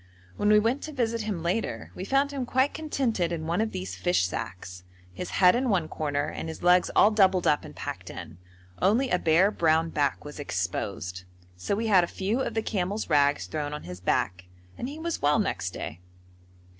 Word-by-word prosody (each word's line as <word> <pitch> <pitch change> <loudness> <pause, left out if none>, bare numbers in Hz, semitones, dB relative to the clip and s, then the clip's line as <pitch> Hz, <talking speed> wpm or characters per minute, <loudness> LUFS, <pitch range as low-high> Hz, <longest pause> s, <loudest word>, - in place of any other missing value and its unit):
When 205 - +1
we 210 - +7
went 230 +6 +1
to 310 - -7
visit 230 -5 -1
him 205 -6 -3
later 180 +7 -2
we 185 - -6
found 275 +4 +2
him 275 -2 -3
quite 260 +3 +1
contented 250 - -1
in 160 -2 -3
one 170 +5 0
of 220 - -1
these 90 0 -5
fish 90 0 +1
sacks, 90 0 -6 0.3
his 175 - -5
head 180 -1 +7
in 255 +1 0
one 180 -6 +1
corner 145 -2 -2
and 160 +1 -5
his 160 - -8
legs 180 0 +5
all 210 - +6
doubled 190 -4 +3
up 150 - +3
and - - -11
packed - - -6
in; 85 +2 -9 0.4
only 225 +8 +3
a 180 - +3
bare 175 +6 +4
brown 160 -2 +2
back 145 -1 0
was 150 0 -8
exposed, 95 -4 -3 0.3
so 90 - -2
we 225 +3 -2
had 195 -5 +5
a - - -1
few 205 +9 -1
of 235 - -3
the 220 - 0
camel's 195 -2 -2
rags 145 -8 +3
thrown 145 +10 -4
on 150 - -8
his 90 0 -8
back, 90 0 -1 0.3
and 245 - -4
he 295 - -7
was 335 +1 -3
well 145 +1 +3
next - - -1
day. 80 - -7
175 Hz, 205 wpm, -27 LUFS, 145-220 Hz, 0.4 s, we